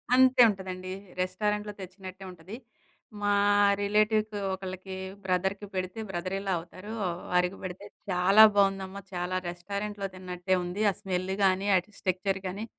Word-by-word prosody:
అంతే 260 Hz, 0 st, +6 dB
ఉంటుందండి. 185 Hz, -2 st, -5 dB, 0.3 s
రెస్టారెంట్‍లో 210 Hz, +3 st, -1 dB
తెచ్చినట్టే 185 Hz, 0 st, -9 dB
ఉంటుంది. 180 Hz, +5 st, -10 dB, 0.7 s
మా 205 Hz, 0 st, +2 dB, 0.5 s
రిలేటివ్‌కి 215 Hz, +1 st, +2 dB, 0.2 s
ఒకళ్ళకి 190 Hz, 0 st, -6 dB, 0.3 s
బ్రదర్‍కి 190 Hz, +2 st, 0 dB
పెడితే 185 Hz, +3 st, -3 dB
బ్రదర్ 185 Hz, +2 st, -3 dB
ఇన్ 195 Hz, -, -6 dB
లా 190 Hz, -, +2 dB
అవుతారు. 185 Hz, +5 st, -10 dB, 0.4 s
వారికి 180 Hz, +2 st, +2 dB
పెడితే, 185 Hz, +2 st, -6 dB, 0.3 s
"చాలా 195 Hz, +4 st, +7 dB
బాగుందమ్మా, 195 Hz, 0 st, +1 dB
చాలా 180 Hz, +1 st, -1 dB
రెస్టారెంట్‍లో 200 Hz, +3 st, -4 dB
తిన్నట్టే 185 Hz, 0 st, -1 dB
ఉంది. 185 Hz, +5 st, -2 dB
ఆ -, -, -7 dB
స్మెల్ 185 Hz, 0 st, -2 dB
కానీ, 190 Hz, +1 st, +2 dB
ఆ -, -, +7 dB, 0.2 s
స్ట్రక్చర్ 190 Hz, +1 st, 0 dB
కానీ, 200 Hz, +4 st, -4 dB
190 Hz, 130 wpm, -29 LUFS, 185-205 Hz, 0.7 s, చాలా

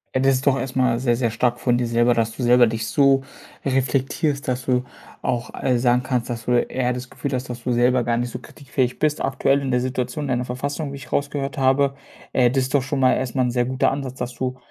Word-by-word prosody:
Ja, 130 Hz, -, +2 dB
das 135 Hz, 0 st, +4 dB
ist 130 Hz, +3 st, -3 dB
doch 135 Hz, -1 st, +4 dB
erstmal 130 Hz, -3 st, 0 dB
sehr, 120 Hz, -2 st, +2 dB
sehr 120 Hz, -3 st, +1 dB
stark 120 Hz, +2 st, 0 dB
von 120 Hz, -1 st, +2 dB
dir 120 Hz, -1 st, 0 dB
selber, 120 Hz, +1 st, +3 dB
dass 115 Hz, -1 st, 0 dB
du -, -, -7 dB
selber 120 Hz, 0 st, +5 dB
dich 110 Hz, -1 st, -3 dB
so 135 Hz, +2 st, +3 dB, 0.4 s
reflektierst, 135 Hz, +2 st, 0 dB
dass 125 Hz, 0 st, -1 dB
du 125 Hz, -1 st, +1 dB, 0.4 s
auch, 120 Hz, -1 st, -2 dB
äh, 125 Hz, -2 st, +2 dB
sagen 125 Hz, 0 st, +2 dB
kannst, 125 Hz, -2 st, -1 dB
dass 115 Hz, -2 st, -5 dB
du -, -, -1 dB
eher 125 Hz, +1 st, +1 dB
das 125 Hz, 0 st, -6 dB
Gefühl 140 Hz, -2 st, -5 dB
hast, 125 Hz, 0 st, -3 dB
dass 120 Hz, -1 st, -7 dB
du 125 Hz, -, +1 dB
selber 125 Hz, 0 st, +3 dB
gar 120 Hz, -, +1 dB
nicht 120 Hz, +1 st, -1 dB
so 125 Hz, -, -6 dB
kritikfähig 130 Hz, -1 st, -3 dB
bist, 150 Hz, -1 st, +1 dB
aktuell 135 Hz, +1 st, +1 dB
in 135 Hz, -, -2 dB
der 125 Hz, 0 st, +2 dB
Situation 130 Hz, +2 st, -3 dB
in 125 Hz, -, +1 dB
der 125 Hz, -, -2 dB
Verfassung, 140 Hz, +3 st, -4 dB
wie -, -, -5 dB
ich 140 Hz, -, -11 dB
rausgehört 140 Hz, -1 st, -2 dB
habe. 135 Hz, +1 st, +2 dB, 0.4 s
Äh, 125 Hz, -2 st, +4 dB
das 135 Hz, +1 st, +1 dB
ist 130 Hz, -, -4 dB
doch 140 Hz, -, +4 dB
schon 135 Hz, +1 st, -2 dB
mal 130 Hz, -, +5 dB
erstmal 130 Hz, 0 st, 0 dB
'n 125 Hz, -, 0 dB
sehr 120 Hz, 0 st, +1 dB
guter 130 Hz, +1 st, +1 dB
Ansatz, 135 Hz, -2 st, -4 dB
dass 125 Hz, 0 st, -4 dB
du 130 Hz, +1 st, -3 dB
125 Hz, 250 wpm, -22 LUFS, 120-135 Hz, 0.4 s, selber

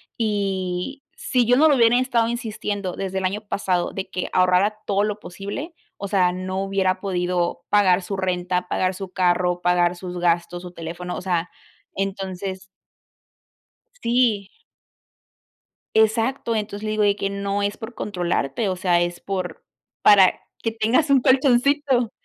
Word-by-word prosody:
y 200 Hz, +2 st, -2 dB
si 245 Hz, -3 st, 0 dB
yo 245 Hz, -, +5 dB
no 315 Hz, +2 st, +6 dB
lo 290 Hz, -, +5 dB
hubiera 235 Hz, -1 st, +5 dB
estado 240 Hz, -3 st, +1 dB
insistiendo 210 Hz, -5 st, -3 dB
desde 190 Hz, -1 st, -4 dB
el 190 Hz, -, -1 dB
año 200 Hz, +3 st, -1 dB
pasado 185 Hz, -4 st, -1 dB
de 195 Hz, 0 st, -4 dB
que 185 Hz, -, -3 dB
ahorrara 185 Hz, +3 st, +3 dB
todo 200 Hz, 0 st, +1 dB
lo 210 Hz, 0 st, -2 dB
posible, 205 Hz, -, -7 dB, 0.3 s
o 200 Hz, -, -4 dB
sea, 185 Hz, -3 st, +3 dB
no 185 Hz, +1 st, -3 dB
hubiera 190 Hz, -1 st, 0 dB
podido 180 Hz, -2 st, -1 dB
pagar 190 Hz, -3 st, +4 dB
su 195 Hz, +1 st, -4 dB
renta, 180 Hz, -1 st, -1 dB
pagar 185 Hz, +1 st, 0 dB
su 190 Hz, 0 st, -7 dB
carro, 180 Hz, -1 st, +1 dB
pagar 175 Hz, 0 st, +2 dB
sus 180 Hz, 0 st, -6 dB
gastos, 175 Hz, 0 st, 0 dB
su 180 Hz, -1 st, -9 dB
teléfono, 175 Hz, +2 st, -6 dB
o -, -, -5 dB
sea, 175 Hz, -2 st, -1 dB, 0.5 s
entonces 190 Hz, -1 st, -4 dB, 1.4 s
Sí. 230 Hz, -5 st, +2 dB, 1.5 s
Exacto, 225 Hz, +3 st, +2 dB
entonces 205 Hz, -1 st, -4 dB
le 215 Hz, -, -2 dB
digo: 215 Hz, 0 st, +1 dB
"De 200 Hz, -1 st, +3 dB
que 195 Hz, -, -1 dB
no 200 Hz, 0 st, -2 dB
es 200 Hz, 0 st, -1 dB
por 225 Hz, +1 st, -8 dB
controlarte, 180 Hz, -, -1 dB
o 185 Hz, -, -2 dB
sea, 180 Hz, -1 st, +2 dB
es 175 Hz, 0 st, -3 dB
por 185 Hz, -2 st, -4 dB, 0.4 s
para 195 Hz, -3 st, +6 dB, 0.2 s
que 225 Hz, -, -1 dB
tengas 230 Hz, +7 st, +1 dB
un 275 Hz, -1 st, +6 dB
colchoncito" 260 Hz, -1 st, +3 dB
195 Hz, 155 wpm, -22 LUFS, 180-220 Hz, 1.5 s, no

